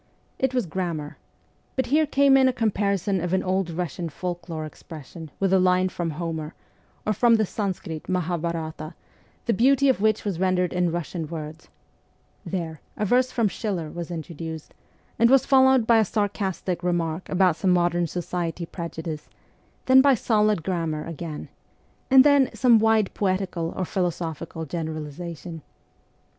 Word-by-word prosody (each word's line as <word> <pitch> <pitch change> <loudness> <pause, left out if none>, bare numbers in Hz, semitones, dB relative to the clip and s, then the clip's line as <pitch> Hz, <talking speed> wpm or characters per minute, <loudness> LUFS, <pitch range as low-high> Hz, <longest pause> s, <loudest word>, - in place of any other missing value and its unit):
It 260 -1 0
was 250 -4 +1
grammar: 165 -4 -4 0.6
but 260 - 0
here 310 0 +4
came 275 0 +4
in 265 -1 +5
a 260 - +2
comparison 200 -4 0
of 175 +1 -2
an 190 - +2
old 185 0 0
Eussian 170 0 -4
folk 175 +2 -5
lore 155 -2 -4
expression 155 +1 -10
with 195 -1 +1
a 190 - +5
line 185 0 +3
from 175 -2 -3
Homer 160 -2 -4 0.5
or 215 - +1
from 230 +3 +4
the 220 -1 +2
Sanskrit 185 -6 -4
Mahabharata, 170 -3 -3 0.5
the 235 - +2
beauty 275 +5 +4
of 255 - +1
which 215 0 +2
was 190 -5 -2
rendered 180 -1 +1
in 180 -1 +1
Eussian 165 -1 -4
words; 160 0 -7 0.8
there, 165 -5 -4 0.2
a 210 - 0
verse 250 +4 +2
from 230 -3 +1
Schiller 185 -7 -3
was 170 -1 -6
introduced, 160 -1 -7 0.5
and 235 +1 +5
was 270 0 +5
followed 265 -3 +5
by 230 0 +5
a - - +5
sarcastic 195 -3 -2
remark 175 -1 -1
about 185 -3 +3
some 190 - 0
modern 175 -1 +2
society 175 0 -3
prejudice; 165 -2 -6 0.6
then 260 0 +7
solid 210 -5 +1
gram 170 -3 -1
mar 155 -1 -4
again, 165 -1 -6 0.6
and 265 -1 +8
then 285 -3 +5
some 235 0 +5
wide 220 -2 +2
poetical 185 -4 -1
or 185 - -1
philo 180 0 0
sophical 160 -1 -6
generalization. 160 +1 -6
180 Hz, 155 wpm, -25 LUFS, 165-215 Hz, 0.8 s, and